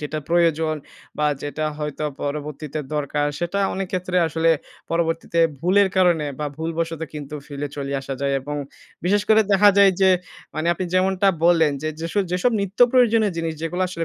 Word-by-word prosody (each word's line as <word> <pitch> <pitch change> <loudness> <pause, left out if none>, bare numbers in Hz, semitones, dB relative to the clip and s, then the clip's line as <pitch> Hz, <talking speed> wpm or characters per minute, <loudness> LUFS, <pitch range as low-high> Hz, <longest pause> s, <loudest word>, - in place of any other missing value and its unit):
যেটা 150 +1 -4
প্রয়োজন। 165 -2 +2 0.4
বা 150 - +2 0.2
যেটা 145 +1 -3
হয়তো 150 0 -4 0.2
পরবর্তীতে 150 +1 -4 0.2
দরকার 145 0 -1
সেটা 175 +3 -2 0.2
অনেক 190 0 -2
ক্ষেত্রে 180 0 -2
আসলে, 160 +1 +2 0.4
পরবর্তীতে 165 0 -1 0.2
ভুলের 195 +3 +4
কারনে 175 -5 +3
বা 150 - -2
ভুলবশত 165 0 -3
কিন্তু 150 0 -7
ফেলে 145 0 -5
চলে 140 -1 -4
আসা 135 0 -5
যায়। 140 0 0
এবং 145 +2 -5 0.5
বিশেষ 205 +3 +2
করে 220 0 +6
দেখা 205 +1 +6
যায় 200 -1 +7
যে, 190 - +6 0.5
মানে, 155 +1 -2
আপনি 185 - -3
যেমনটা 190 +1 +3 0.2
বললেন 165 -4 +4
যে, 155 - -1
যেসব, 170 +5 0
যেসব, 180 +7 +2
নিত্য 200 +1 -5
প্রয়োজনীয় 230 -5 +4
জিনিস 165 -1 -2
যেগুলা 175 +3 -2
আসলে 170 -2 -3
165 Hz, 165 wpm, -22 LUFS, 150-185 Hz, 0.5 s, যায়